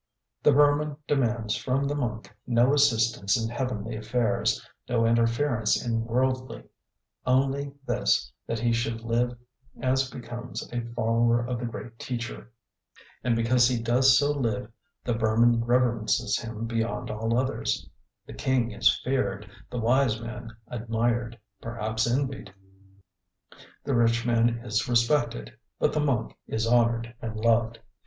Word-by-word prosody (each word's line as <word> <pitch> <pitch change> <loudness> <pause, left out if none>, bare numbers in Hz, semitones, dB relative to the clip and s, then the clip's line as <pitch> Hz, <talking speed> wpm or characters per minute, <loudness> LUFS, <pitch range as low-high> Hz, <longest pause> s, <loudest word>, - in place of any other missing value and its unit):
The - - +5
Burman 145 +1 +3
demands 120 -6 0
from 130 +2 -1
the 140 +1 -1
monk 115 -6 -4
no 120 +2 +4
assistance 115 -8 +3
in 115 0 -2
heavenly 120 -3 -3
affairs, 115 +2 0 0.2
no 115 -2 +2
interference 115 0 +2
in 115 -1 -1
worldly, 130 +2 -1 0.6
only 135 +2 +1
this, - - +1
that 115 - -2
he 120 +1 +1
should 115 -1 -1
live 120 +2 0 0.4
as 130 0 +1
becomes 120 0 -7
a 120 - -1
follower 115 +1 +2
of 120 -1 -3
the 120 - -3
great 115 0 -8
teacher. 120 -2 -5 0.7
And 120 -2 +2
because 120 +1 +4
he 125 -2 0
does 130 +3 +4
so 145 0 +2
live 125 -4 -2 0.3
the 120 - 0
Burman 115 +1 +3
reverences 120 -2 +1
him 115 -1 -5
beyond 115 +1 -2
all 115 +2 -1
others. 130 +1 -1 0.4
The - - -10
king 125 -3 0
is 105 +2 +3
feared, 105 -6 -1 0.2
the 125 - -5
wise 120 0 +2
man 120 0 -7 0.2
admired, 120 0 -1 0.2
perhaps 110 -1 -2
envied, 125 -5 -2 1.3
the 140 - -1
rich 115 0 +2
man 115 0 +1
is 105 -2 0
respected, 120 - +1 0.2
but - - +1
the - - +1
monk 135 -6 0
is 110 0 -1
honoured 120 0 +2
and 110 -1 -5
loved. 115 +1 +2
120 Hz, 135 wpm, -27 LUFS, 115-125 Hz, 1.3 s, The